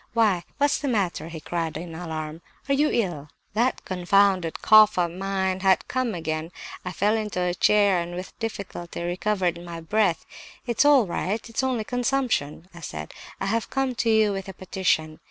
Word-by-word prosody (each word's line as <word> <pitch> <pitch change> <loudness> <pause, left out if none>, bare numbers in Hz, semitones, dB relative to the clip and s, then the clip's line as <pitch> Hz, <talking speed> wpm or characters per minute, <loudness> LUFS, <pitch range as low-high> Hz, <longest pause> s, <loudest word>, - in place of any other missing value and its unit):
'Why 210 -7 +3
what's 285 0 +2
the 290 - -3
matter?' 195 -9 -1
he 165 -1 -7
cried 165 0 -3
in 165 +1 -7
alarm. 160 -1 -5 0.3
'Are 275 - +2
you 295 +2 +3
ill?' 170 -10 -1 0.2
"That 235 +4 0
confounded 185 -1 +2
cough 215 -1 +7
of 175 -2 +1
mine 190 0 -1
had 190 -1 +3
come 255 -1 0
on 220 - -3
again; 160 0 -3 0.3
I 180 - -4
fell 205 +4 +1
into 210 -4 -2
a 180 -1 +1
chair, 200 0 +4
and 175 +1 -6
with 185 +1 -7
difficulty 195 -6 -5
recovered 175 -1 -1
my 170 -1 -7
breath. 180 +1 +1 0.4
'It's 240 +3 +2
all 285 -5 +6
right, 200 +5 -3
it's 230 +2 -2
only 255 -4 0
consumption' 245 - -1
I 175 - -11
said. 80 - -7 0.3
'I - - -2
have 225 +3 -1
come 270 -1 0
to 230 - +1
you 220 -2 +4
with 195 0 -5
a - - -7
petition! 175 -4 -1
190 Hz, 185 wpm, -25 LUFS, 170-220 Hz, 0.4 s, cough